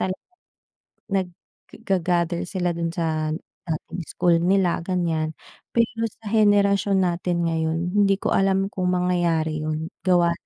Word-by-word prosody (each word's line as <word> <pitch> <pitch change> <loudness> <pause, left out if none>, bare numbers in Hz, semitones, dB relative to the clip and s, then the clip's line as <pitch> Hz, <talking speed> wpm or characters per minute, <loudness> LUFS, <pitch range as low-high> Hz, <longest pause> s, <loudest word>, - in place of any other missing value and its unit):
talagang 185 0 -1 1.0
nagga-gather 180 -2 -2
sila 180 -2 -1
doon 170 0 -3
sa 155 -2 -1 0.3
dating 165 +2 -4
school 175 -1 +2
nila, 185 0 +2
ganiyan. 165 -4 -1 0.4
Pero, 230 -1 +1
sa 220 -1 -10
henerasyon 200 -2 +3
natin 175 0 0
ngayon, 160 0 0
hindi 200 0 +3
ko 195 - -2
alam 195 0 +2
kung 185 -3 -2
mangyayari 175 -3 +1
'yon, 155 +2 -3
gawa 175 -2 +4
180 Hz, 120 wpm, -23 LUFS, 165-195 Hz, 1.0 s, gawa